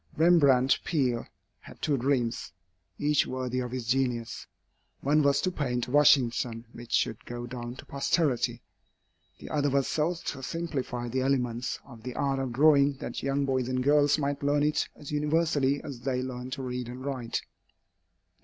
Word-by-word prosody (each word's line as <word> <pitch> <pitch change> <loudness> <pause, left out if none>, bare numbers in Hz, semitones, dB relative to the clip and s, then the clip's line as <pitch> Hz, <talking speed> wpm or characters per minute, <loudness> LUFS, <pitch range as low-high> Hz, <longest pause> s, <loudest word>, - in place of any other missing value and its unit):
Rembrandt 140 -6 +5
Peale 130 -7 0 0.3
had - - -14
two 150 - +1
dreams, 125 -6 0 0.5
each 150 +2 +2
worthy 130 -1 -2
of 125 -1 -3
his 125 -1 -4
genius. 120 -2 -1 0.5
One 150 +3 +3
was 140 -1 +3
to 185 - 0
paint 125 -7 -1
a - - -9
Washington 125 -5 +3
which 120 0 -11
should 110 0 0
go 120 0 -6
down 120 0 -6
to - - -11
posterity; 130 -4 0 0.7
the - - -10
other 145 -1 +1
was 135 0 +1
so 160 +3 0
to 150 -4 -6
simplify 130 -5 -3
the 130 +2 -1
elements 125 -3 -1
of 115 -2 -13
the 125 +1 -6
art 135 -1 0
of 130 -2 -2
drawing 140 +2 +5
that 135 - -6
young 140 +1 0
boys 130 -2 0
and 130 0 0
girls 145 +1 +4
might 145 -1 -2
learn 145 +1 +2
it 150 0 +1
as 145 - -10
universally 150 -2 +1
as 135 -4 -7
they 130 0 -1
learn 125 -1 -5
to 135 0 -5
read 125 -1 -4
and 125 +2 -8
write. 130 -5 -3
135 Hz, 170 wpm, -28 LUFS, 125-145 Hz, 0.7 s, Rembrandt